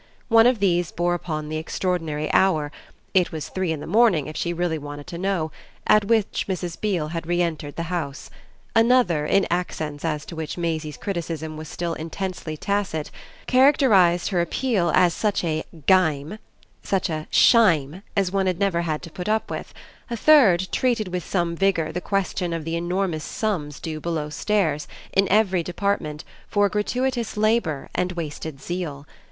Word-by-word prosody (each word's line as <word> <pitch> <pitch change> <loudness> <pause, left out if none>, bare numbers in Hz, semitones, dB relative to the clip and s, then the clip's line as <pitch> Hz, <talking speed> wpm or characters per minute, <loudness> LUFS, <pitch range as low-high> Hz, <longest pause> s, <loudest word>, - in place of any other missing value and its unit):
One 225 0 +7
of 250 -1 +3
these 175 -4 +1
bore 175 +1 0
upon 155 -3 -3
the 155 - -2
extraordinary 160 -2 -2
hour 155 -6 +3 0.4
it 185 -2 +3
was 160 -3 -5
three 185 -3 -1
in 155 -2 -3
the - - -6
morning 210 - +3
if 155 - -7
she 170 - -1
really 170 -2 -1
wanted 145 0 -8
to 170 -2 -7
know 180 -4 -1 0.3
at 215 -1 +5
which 220 -1 +1
Mrs. 175 -2 -4
Beale 180 -8 0
had 165 0 -5
re 175 0 +1
entered 160 -4 -2
the 170 - -3
house; 165 -5 -4 0.4
another, 225 -10 +4
in 195 - +3
accents 155 -4 -2
as 150 -3 -2
to 170 - -8
which 160 0 -5
Maisie's 160 -4 -2
criticism 165 -4 -4
was 155 0 -7
still 170 -1 -3
intensely 165 -1 -5
tacit, 200 -5 -2 0.3
characterised 250 - +4
her 180 -4 +1
appeal 180 -1 0
as 180 -2 +4
such 210 -3 0
a 155 -2 -1 0.2
"gime," 165 0 +2 0.4
such 195 -2 0
a 155 -2 -4
"shime," 180 - +4 0.2
as 195 -2 +2
one 195 -1 +1
had 180 -2 0
never 190 -3 +1
had 155 -3 -2
to 170 - -9
put 180 +5 -5
up 220 +1 0
with; - - -5 0.4
a 235 - -3
third 215 - +5
treated 235 -6 +1
with 180 -1 -3
some 170 -1 -1
vigour 175 -4 +1
the 180 - -4
question 185 -3 -1
of 165 -2 -4
the 165 0 -2
enormous 175 -1 -1
sums 175 - -3
due 155 -2 -5
belowstairs, 155 +1 -1 0.3
in 195 0 +3
every 195 -3 +3
department, 170 -4 -2 0.2
for 205 -1 +2
gratuitous 240 +3 -1
labour 215 -10 +1
and 180 0 -1
wasted 160 -3 -5
zeal. 150 -3 -5
175 Hz, 170 wpm, -23 LUFS, 155-195 Hz, 0.4 s, One